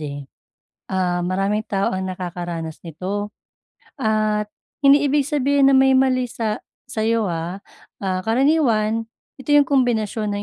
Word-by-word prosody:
eh. 145 -2 -6 0.6
Ah, 180 -2 0
maraming 195 +4 0
tao 195 -1 0
ang 190 0 -2
nakakaranas 175 -3 -5
nito, 195 +6 -4 0.6
at 215 -3 0 0.3
hindi 285 +1 +6
ibig 285 0 +2
sabihin 280 -1 +3
na - - +4
may 265 0 +5
mali 255 -1 +2
sa 220 -2 -3 0.3
sa'yo, 225 0 0
ah. 170 +3 -4 0.4
Ah, 185 -1 -1
karaniwan 225 -3 +2 0.3
ito 270 +2 -7
'yung 290 -2 +6
kumbinasyon 225 -6 +1
ng 205 0 -3
215 Hz, 130 wpm, -21 LUFS, 185-260 Hz, 0.6 s, hindi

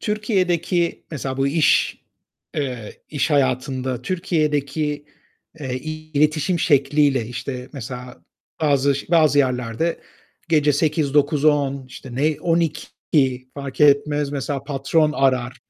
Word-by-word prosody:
Türkiye'deki 185 -5 0
mesela 135 -4 -4
bu 135 0 +1
iş 150 +1 +2 0.6
eee, 125 -7 -5
iş 150 +1 -1
hayatında 130 -2 0
Türkiye'deki, 150 -3 -1 0.6
eee, 130 -3 -3
iletişim 155 +3 -1
şekliyle, 140 -4 +2
işte, 125 +2 -6
mesela 125 -1 -8 0.4
bazı 140 -2 +3
ş 140 - -5
bazı 155 -4 +4
yerlerde 125 +4 0 0.5
gece 150 -3 +3
20.00-21.00-22.00, 145 -2 +1
işte, 130 -1 -10
ne 150 +4 +1
00.00, 150 -5 0
fark 140 -1 -7
etmez, 145 0 +3
mesela 140 -1 -3
patron 150 +2 +1
arar. 130 -3 +1
145 Hz, 105 wpm, -21 LUFS, 130-155 Hz, 0.6 s, bazı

